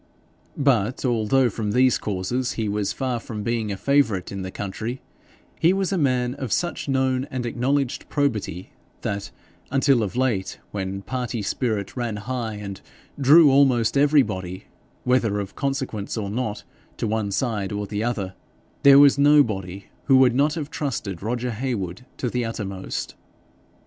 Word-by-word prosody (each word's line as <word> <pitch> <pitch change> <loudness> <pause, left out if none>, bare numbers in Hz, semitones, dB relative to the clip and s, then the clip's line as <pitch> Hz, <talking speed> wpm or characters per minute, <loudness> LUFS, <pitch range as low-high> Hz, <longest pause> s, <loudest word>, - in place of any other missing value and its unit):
But, 125 -4 +1
although 120 +2 +3
from 105 -1 -3
these 130 0 +4
causes 105 +6 -2
he 110 -2 -2
was 100 -1 -1
far 130 -3 -2
from 110 -2 -6
being 115 -2 -1
a 100 - -3
favourite 115 -8 +1
in 100 -1 -5
the 95 - -4
county, 110 +6 -5 0.6
he 170 +3 +4
was 195 -1 0
a 195 - +1
man 125 -4 +1
of 130 -5 -6
such 175 -4 -1
known 130 0 +1
and 125 -2 -3
acknowledged 130 +3 -1
probity 110 - -1 0.3
that, 100 0 -3 0.4
until 135 -2 +3
of 105 0 -3
late, 120 -7 0
when 95 -1 -4
party 125 -3 -3
spirit 105 -3 -2
ran 120 -4 -2
high 115 0 -4
and 100 -2 -7 0.4
drew 145 +2 +7
almost 130 -4 +4
everybody, 105 -11 +2 0.4
whether 120 -5 +2
of 100 -1 -5
consequence 130 -7 -3
or 100 -2 -3
not, 110 -2 -3 0.3
to - - -2
one 110 -1 -1
side 105 -2 -1
or 105 0 -2
the 105 +1 -3
other, 105 -6 -2 0.5
there 140 0 +8
was 140 -1 +7
nobody 105 -11 +3 0.2
who 135 -2 +6
would 130 -2 +5
not 145 +5 +2
have 155 -2 -5
trusted 110 - -3
Roger 120 +3 -2
Heywood 115 -3 -4
to 125 - -2
the 125 +1 -1
uttermost. 100 -4 -4
120 Hz, 155 wpm, -23 LUFS, 105-135 Hz, 0.6 s, there